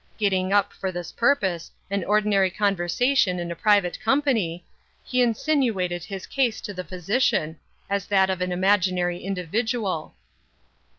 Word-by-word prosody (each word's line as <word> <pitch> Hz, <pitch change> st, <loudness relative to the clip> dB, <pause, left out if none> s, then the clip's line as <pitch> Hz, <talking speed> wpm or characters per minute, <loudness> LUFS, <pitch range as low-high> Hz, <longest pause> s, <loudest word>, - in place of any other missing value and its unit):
Getting 190 Hz, -3 st, +1 dB
up, 205 Hz, 0 st, +2 dB
for 190 Hz, -, -4 dB
this 175 Hz, -1 st, -6 dB
purpose, 195 Hz, -10 st, +1 dB, 0.2 s
an 200 Hz, -2 st, 0 dB
ordinary 205 Hz, -2 st, +3 dB
conversation 195 Hz, +3 st, +1 dB
in 175 Hz, -1 st, -4 dB
a -, -, -4 dB
private 200 Hz, -2 st, +2 dB
company, 225 Hz, -, 0 dB, 0.4 s
he 250 Hz, 0 st, 0 dB
insinuated 225 Hz, -, 0 dB
his 195 Hz, 0 st, -7 dB
case 255 Hz, -5 st, 0 dB
to 205 Hz, -, -6 dB
the 185 Hz, -1 st, -5 dB
physician, 180 Hz, -2 st, 0 dB, 0.3 s
as 200 Hz, -1 st, -2 dB
that 190 Hz, -2 st, +3 dB
of 185 Hz, -1 st, -3 dB
an 180 Hz, 0 st, -1 dB
imaginary 185 Hz, -1 st, +1 dB
individual. 195 Hz, 0 st, -2 dB
195 Hz, 135 wpm, -24 LUFS, 180-215 Hz, 0.4 s, ordinary